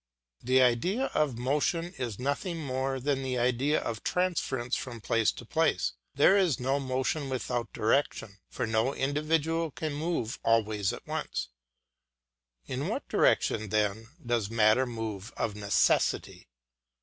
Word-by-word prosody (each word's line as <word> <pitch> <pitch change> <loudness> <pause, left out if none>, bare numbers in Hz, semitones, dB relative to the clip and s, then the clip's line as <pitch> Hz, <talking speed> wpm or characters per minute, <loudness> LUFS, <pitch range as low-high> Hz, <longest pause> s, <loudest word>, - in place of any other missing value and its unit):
The 130 +1 +4
idea 180 - +1
of 140 -6 +1
motion 150 +7 0
is 120 - -4
nothing 140 +7 -2
more 135 -2 -2
than 135 +1 0
the 130 -1 -2
idea 125 +5 +2
of 115 -2 -4
transference 140 -9 0
from 120 -3 -5
place 115 0 +2
to 120 - -10
place; 160 +7 +1 0.2
there 145 +8 +6
is 185 - +2
no 135 +3 +1
motion 135 +2 -1
without 120 -2 -2
direction; 110 -3 0
for 130 - -2
no 115 +4 +1
individual 155 +3 0
can 155 +1 -4
move 145 -6 -2
all 115 0 +4
ways 105 -2 -1
at - - -8
once. - - -3 1.2
In - - -3
what - - -3
direction 110 -1 +2
then 110 +2 0 0.2
does 115 -4 0
matter 115 +3 +4
move 115 -3 -5
of 105 - -1
necessity? 100 -1 +1
130 Hz, 140 wpm, -29 LUFS, 115-145 Hz, 1.2 s, there